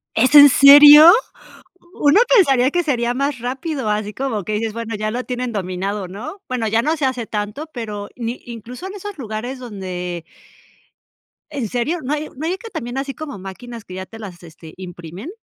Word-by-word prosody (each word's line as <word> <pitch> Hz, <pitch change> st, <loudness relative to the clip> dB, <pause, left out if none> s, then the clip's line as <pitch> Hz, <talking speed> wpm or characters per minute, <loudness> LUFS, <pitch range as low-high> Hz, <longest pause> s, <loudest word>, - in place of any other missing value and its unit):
¿Es 255 Hz, +6 st, +2 dB
en 290 Hz, -1 st, +10 dB
serio? 290 Hz, +4 st, +9 dB, 0.9 s
Uno 290 Hz, +7 st, +5 dB
pensaría 270 Hz, -, +4 dB
que 350 Hz, +2 st, 0 dB
sería 240 Hz, -6 st, -1 dB
más 275 Hz, -1 st, -2 dB
rápido, 260 Hz, +1 st, -4 dB
así 210 Hz, 0 st, -2 dB
como 235 Hz, -6 st, -3 dB
que 215 Hz, -, -4 dB
dices, 215 Hz, 0 st, -2 dB
bueno, 230 Hz, -1 st, -5 dB
ya 215 Hz, +1 st, -3 dB
lo 250 Hz, +2 st, -4 dB
tienen 250 Hz, -1 st, -4 dB
dominado, 195 Hz, 0 st, -4 dB
¿no? 255 Hz, -, -9 dB
Bueno, 245 Hz, -3 st, -2 dB
ya 225 Hz, +2 st, +1 dB
no 310 Hz, +4 st, 0 dB
se 290 Hz, -, -1 dB
hace 250 Hz, -3 st, -2 dB
tanto, 210 Hz, +9 st, -5 dB
pero 210 Hz, -4 st, -6 dB
ni 235 Hz, 0 st, -5 dB
incluso 240 Hz, -, -9 dB
en 385 Hz, -, -8 dB
esos 410 Hz, -2 st, -8 dB
lugares 240 Hz, +2 st, -6 dB
donde. 180 Hz, -7 st, -6 dB, 1.3 s
¿En 270 Hz, -8 st, -4 dB
serio? 285 Hz, -, -2 dB
¿No 270 Hz, +3 st, -4 dB
hay 300 Hz, +1 st, -4 dB
no 310 Hz, -, -5 dB
hay 360 Hz, +3 st, -1 dB
que 455 Hz, +2 st, -11 dB
también 245 Hz, -, -6 dB
así 275 Hz, 0 st, -4 dB
como 285 Hz, -4 st, -8 dB
máquinas 225 Hz, +5 st, -10 dB
que 185 Hz, -, -11 dB
ya 185 Hz, 0 st, -7 dB
te 225 Hz, -, -13 dB
las, 185 Hz, -5 st, -10 dB
este, 160 Hz, -1 st, -14 dB
imprimen? 180 Hz, -, -9 dB
240 Hz, 190 wpm, -19 LUFS, 210-280 Hz, 1.3 s, en